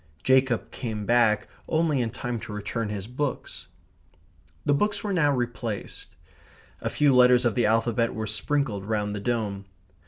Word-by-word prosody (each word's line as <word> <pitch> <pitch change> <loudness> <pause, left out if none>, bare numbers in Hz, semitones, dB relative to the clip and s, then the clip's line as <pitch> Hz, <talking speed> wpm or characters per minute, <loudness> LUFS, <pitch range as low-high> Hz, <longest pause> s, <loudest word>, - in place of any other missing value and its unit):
Jacob 130 -2 +2
came 110 -4 -4
back 115 -2 +3 0.2
only 155 -4 +1
in 115 - -1
time 120 +1 -4
to 105 - -8
return 105 +2 -3
his 100 -2 -4
books. 130 +4 -4 1.0
The 145 - +3
books 205 +6 0
were 205 -2 -1
now 150 -5 +3
replaced. 120 -4 -4 0.7
A - - -1
few 145 -2 +3
letters 125 0 +6
of 120 - +2
the 120 -1 +2
alphabet 115 +1 +1
were 110 -1 -3
sprinkled 110 -1 -1
round 105 -1 -1
the 105 - -4
dome. 100 -3 -2
120 Hz, 155 wpm, -26 LUFS, 105-130 Hz, 1.0 s, letters